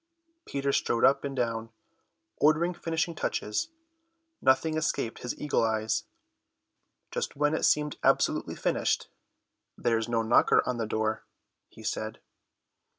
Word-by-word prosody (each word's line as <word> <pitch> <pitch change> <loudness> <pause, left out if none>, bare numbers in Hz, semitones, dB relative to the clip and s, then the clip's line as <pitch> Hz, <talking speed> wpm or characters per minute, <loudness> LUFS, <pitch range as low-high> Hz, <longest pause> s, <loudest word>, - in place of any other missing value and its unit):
Peter 140 0 -1
strode 115 - +2
up 135 +1 +4
and 140 -1 -4
down, 115 -2 -1 0.7
ordering 155 +4 +3
finishing 165 0 -2
touches. 105 - -2 0.7
Nothing 155 +4 +3
escaped 150 -7 -1
his 125 - -5
eagle 150 -5 +1
eyes. 110 -1 0 1.1
Just - - -3
when 150 +1 +2
it 160 - +1
seemed 150 -1 +2
absolutely - - +2
finished: - - 0 0.7
"There's 115 -1 0
no 115 -1 +1
knocker 110 +2 +4
on 125 - -1
the 115 -2 -2
door," 110 0 -1 0.5
he - - -14
said. 110 +1 -3
125 Hz, 125 wpm, -28 LUFS, 115-150 Hz, 1.1 s, up